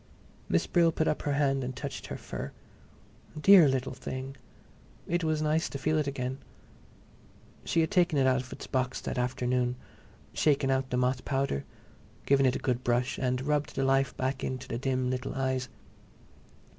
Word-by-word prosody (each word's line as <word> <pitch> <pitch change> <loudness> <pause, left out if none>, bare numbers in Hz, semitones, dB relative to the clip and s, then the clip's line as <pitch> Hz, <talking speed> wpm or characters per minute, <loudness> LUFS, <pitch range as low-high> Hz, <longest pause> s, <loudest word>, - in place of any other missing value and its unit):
Miss - - +2
Brill 170 -2 +3
put 160 - 0
up 150 - 0
her 145 - -1
hand 135 -1 +1
and 130 0 -4
touched 140 0 -6
her - - -5
fur. - - -6 0.9
Dear 185 -1 +8
little 130 -1 -1
thing! 130 +1 -6 0.7
It 175 0 0
was 155 -1 0
nice 155 +2 +1
to - - -5
feel 155 +3 +1
it 150 - -1
again. 130 -1 -3 1.3
She 165 - +2
had 160 - 0
taken 175 -5 +3
it 135 - +3
out 130 0 +3
of 130 - -13
its - - -7
box 130 0 -1
that 130 - -3
afternoon, 125 0 0 0.6
shaken 140 -3 +2
out 130 0 0
the 125 - -1
moth 125 +1 +1
powder, 135 - -1 0.6
given 135 -1 +4
it 125 - +1
a - - +1
good 125 -2 -1
brush, 120 +2 0
and 125 0 0
rubbed 150 0 -1
the 135 - 0
life 135 0 +2
back 130 +1 -2
into 130 -1 -4
the 115 - -3
dim 130 -1 0
little 130 0 -3
eyes. 130 -1 -1
135 Hz, 180 wpm, -29 LUFS, 130-145 Hz, 1.3 s, Dear